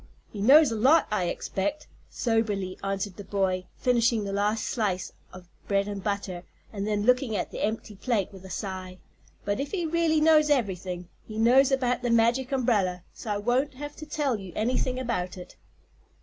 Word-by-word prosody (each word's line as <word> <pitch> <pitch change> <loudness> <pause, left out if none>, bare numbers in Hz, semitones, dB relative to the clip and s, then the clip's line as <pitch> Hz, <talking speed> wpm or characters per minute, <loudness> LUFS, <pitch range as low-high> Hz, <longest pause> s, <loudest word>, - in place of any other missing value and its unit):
"He 205 - -5
knows 280 +5 +7
a - - -1
lot, 275 +9 +5
I 195 -4 +1
expect," 285 - -3 0.2
soberly 210 -5 -1
answered 195 -1 -3
the 205 - -7
boy, 190 -2 -1
finishing 235 -3 +2
the 200 0 -4
last 210 +2 0
slice 200 -6 -2 0.2
of 185 -1 -12 0.2
bread 200 0 +1
and 200 -2 -5
butter 200 -3 -3 0.3
and 200 0 -3
then 210 -1 0
looking 250 -1 +2
at - - -2
the - - -4
empty 215 -1 -3
plate 205 -3 -1
with 190 -1 -12
a 190 - -10
sigh; 185 -1 -5 0.5
"but 205 +3 -1
if 280 +1 -2
he 355 -4 -1
really 325 -1 +2
knows 305 -1 +5
everthing 185 -9 -1 0.2
he 215 - -7
knows 255 +5 +5
about 250 -2 +1
the 245 - -1
Magic 235 +3 +2
Umbrella, 205 -9 +1
so 225 - -8
I 205 - 0
won't 250 +6 0
have 290 +2 -7
to 310 - -9
tell 285 -7 -1
you 190 -2 -9
anything 250 +3 0
about 185 -8 -2
it." 180 - -11
220 Hz, 185 wpm, -27 LUFS, 195-255 Hz, 0.5 s, knows